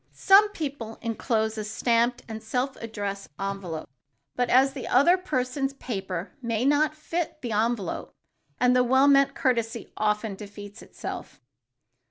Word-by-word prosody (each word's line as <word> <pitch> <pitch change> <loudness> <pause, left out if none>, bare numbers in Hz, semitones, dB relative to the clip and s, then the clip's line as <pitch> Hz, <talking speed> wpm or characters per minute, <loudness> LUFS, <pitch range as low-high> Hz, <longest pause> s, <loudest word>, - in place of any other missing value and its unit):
Some 405 +2 +6
people 280 - -5
enclose 220 -1 -1
a - - -2
stamped 235 +3 +1
and 220 -1 -6
self 250 +4 -2
addressed 205 -3 -5
envelope 195 -5 -4 0.5
but 245 -1 0
as 270 +2 +5
the 270 - -6
other 285 +8 +5
person's 270 -6 -2
paper 195 -8 -5
may 230 0 -1
not 295 +2 +3
fit 330 +1 -3
the 240 - -3
envelope, 215 -3 -1 0.4
the 250 0 +4
well 265 +3 +4
meant 275 -1 +5
courtesy 230 -2 -1
often 210 0 0
defeats 205 0 -10
itself. - - -8
235 Hz, 135 wpm, -26 LUFS, 215-270 Hz, 0.5 s, Some